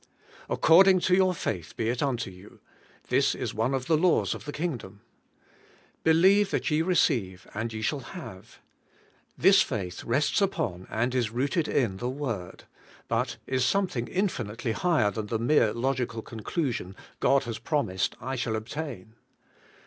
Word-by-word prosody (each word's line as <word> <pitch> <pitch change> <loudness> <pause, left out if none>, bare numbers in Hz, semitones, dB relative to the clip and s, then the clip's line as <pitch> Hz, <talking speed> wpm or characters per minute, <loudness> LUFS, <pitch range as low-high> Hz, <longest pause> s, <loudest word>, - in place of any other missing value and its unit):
'According 185 +3 +6
to 180 - +2
your 185 0 +4
faith 90 - -4
be 110 - -1
it 120 +1 -1
unto 120 -8 -1
you 90 +3 -15 0.2
:' - - -30
this - - +3
is - - -4
one 115 +5 0
of 130 -1 -3
the 160 - +3
laws 175 +3 +2
of - - -9
the 145 - -4
kingdom. 145 -10 -5 1.0
'Believe 190 +5 +5
that 180 - -1
ye 150 +1 +3
receive, 115 - +1
and 115 +2 -3
ye 110 0 -5
shall 145 +5 0
have.' 130 - -10 0.8
This - - +6
faith 90 -3 -3
rests 140 - +1
upon, 155 - -1
and 120 +3 -1
is 125 -4 +1
rooted 140 +8 0
in 115 -9 0
the 120 +5 -3
Word; 120 -10 -5 0.4
but - - -1
is 130 -1 0
something 175 -5 0
infinitely 120 - -2
higher 120 -2 +2
than 105 +1 -4
the 115 - -1
mere 115 -1 +3
logical 120 -2 -2
conclusion: 115 - -3 0.2
God 135 0 +3
has 115 -2 -5
promised, 110 - -1
I 130 +3 -4
shall 120 -3 -1
obtain. 110 -2 -6
125 Hz, 155 wpm, -27 LUFS, 110-160 Hz, 1.0 s, According